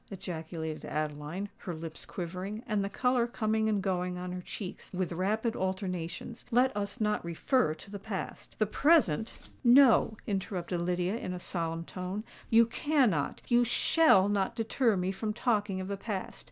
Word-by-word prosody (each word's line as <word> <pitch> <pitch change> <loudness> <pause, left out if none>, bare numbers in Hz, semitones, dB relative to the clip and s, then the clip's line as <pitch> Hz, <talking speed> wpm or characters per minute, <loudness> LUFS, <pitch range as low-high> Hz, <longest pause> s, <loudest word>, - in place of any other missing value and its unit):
ejaculated 160 -4 -5
Adeline, 155 +5 -3
her 175 - -5
lips 160 0 -7
quivering, 185 +5 -5
and 210 -4 0
the 200 - -2
colour 250 +2 +2
coming 220 -2 0
and 205 -3 +1
going 180 -2 -1
on 180 0 -5
her 180 0 -4
cheeks 185 +1 -7
with 185 -1 -2
rapid 215 +6 0
alternations. 185 +3 -3
"Let 250 0 +3
us 205 +4 -3
not 210 -1 +1
refer 170 - +1
to 200 - -13
the 200 - -5
past. 195 -1 -6
The 215 - +3
present——" 225 - +2
"No," 240 -3 +6
interrupted 185 -3 -2
Lydia, 180 +4 0
in 185 -6 -4
a 180 - -5
solemn 165 -2 -3
tone: 185 +4 -5 0.3
"you 230 0 +7
can 270 +1 +2
not—you 240 - +1
shall 240 - +4
not 205 +2 0
deter 225 -1 +1
me 180 +1 0
from 215 +2 -3
talking 210 -5 0
of 185 - -4
the 200 0 -3
past. 195 -1 -4
195 Hz, 165 wpm, -30 LUFS, 180-225 Hz, 0.3 s, you